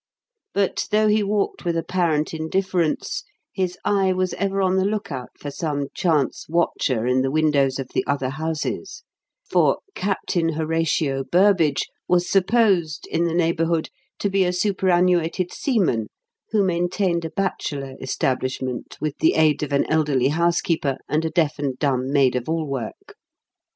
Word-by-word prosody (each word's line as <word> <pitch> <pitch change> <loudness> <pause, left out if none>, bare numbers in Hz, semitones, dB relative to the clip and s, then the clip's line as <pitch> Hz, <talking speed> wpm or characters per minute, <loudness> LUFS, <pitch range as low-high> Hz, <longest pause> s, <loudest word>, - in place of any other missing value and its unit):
But, 200 -1 0
though 215 0 +3
he 210 0 +3
walked 205 0 -1
with 170 -2 0
apparent 165 -3 0
indifference, 170 +1 -1 0.3
his 185 -2 -2
eye 195 -2 +2
was 185 0 0
ever 195 0 -1
on 190 -1 +2
the 190 - +3
lookout 190 -11 -3
for 145 - -6
some 145 -2 -3
chance 155 -7 0
watcher 145 -8 0
in 125 +1 +2
the 135 - 0
windows 145 -3 +2
of 135 -2 -5
the - - +1
other 135 -1 0
houses; 155 +2 -4 0.4
for - - +3 0.2
"Captain 180 -3 -1
Horatio 155 -3 0
Burbage" 175 -2 +3 0.2
was 180 0 +2
supposed, 195 -6 +2
in 170 +1 +1
the 170 -1 -1
neighbourhood, 165 -1 +1 0.3
to - - -1
be 195 0 +3
a 180 - +1
superannuated 180 -2 +1
seaman 180 - +1 0.4
who 215 -2 +2
maintained 175 0 0
a 165 - -3
bachelor 145 -8 -3
establishment 130 -1 -2
with 155 -2 -2
the 160 - +3
aid 155 -2 +3
of 150 -1 -3
an 140 - +2
elderly 145 -5 +2
housekeeper 165 -3 +1
and 155 +2 0
a - - 0
deaf 155 -2 0
and 135 -3 -2
dumb 130 -2 0
maid 135 -3 +3
of 125 +3 -3
all 160 -1 0
work. 135 -6 -6
165 Hz, 150 wpm, -23 LUFS, 140-185 Hz, 0.4 s, though